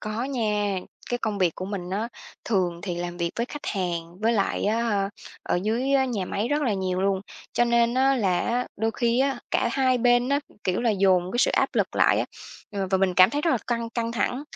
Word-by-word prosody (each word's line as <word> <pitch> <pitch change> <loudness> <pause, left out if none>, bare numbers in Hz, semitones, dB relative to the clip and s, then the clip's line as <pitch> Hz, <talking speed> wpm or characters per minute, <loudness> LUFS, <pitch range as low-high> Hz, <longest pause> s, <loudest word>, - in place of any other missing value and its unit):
Có 215 +3 -3
nha. 210 -7 0 0.3
Cái 245 - 0
công 215 -3 -2
việc 180 -4 +2
của 185 - -5
mình 190 -2 -5
á 215 +4 -2 0.4
thường 180 -6 0
thì 180 -3 -3
làm 175 0 -4
việc 170 -1 -1
với 235 +1 -1
khách 295 +1 -8
hàng, 175 -3 -3
với 225 +2 +2
lại 200 -3 0
á, 225 +3 +1
hơ, 200 -4 0 0.3
ở - - 0
dưới 240 +6 0
á 270 -1 +4
nhà 220 -7 -2
máy 210 +6 -2
rất 295 +1 +1
là 240 - +1
nhiều 185 -1 -1
luôn. 195 0 +1 0.3
Cho 240 - +3
nên 235 0 +2
á 265 +1 +3
là 190 -7 +1
á, 245 +1 0
đôi 225 +1 0
khi 235 +1 +1
á, 270 -2 +1
cả - - +2
hai 255 -1 +2
bên 245 +1 +3
á, 280 +1 +2 0.2
kiểu 185 +3 0
là, 235 -2 +2
dồn 185 -3 +3
cái 240 - -2
sự 265 - +4
áp - - +2
lực - - 0
lại - - +4
á, - - +1 0.5
ờ, 195 -2 -2
và 190 - +3
mình 185 -1 +2
cảm 185 +1 +7
thấy 290 - -1
rất 335 - +2
là 260 - +3
căng 235 -1 -2
căng 230 -1 -2
thẳng. 245 +5 -1
220 Hz, 245 wpm, -25 LUFS, 190-245 Hz, 0.5 s, cảm